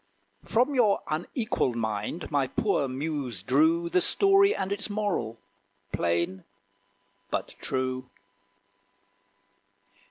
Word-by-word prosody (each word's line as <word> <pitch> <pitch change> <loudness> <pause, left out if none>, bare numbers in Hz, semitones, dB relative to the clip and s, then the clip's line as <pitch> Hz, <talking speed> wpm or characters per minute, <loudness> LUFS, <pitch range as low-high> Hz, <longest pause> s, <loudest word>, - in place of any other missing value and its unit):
From 250 +6 +2
your 220 -6 +3
unequalled 165 - -1
mind 110 +9 -3
my 140 -3 +2
poor 140 - +1
muse 130 - -3
drew 160 +8 +3
The 180 +1 +2
story 395 - +4
and 190 0 -2
its 200 +1 -2
moral, 205 - -1 0.5
plain 85 +2 0 0.9
but - - -2
true. 130 0 -2
155 Hz, 95 wpm, -28 LUFS, 120-205 Hz, 0.9 s, story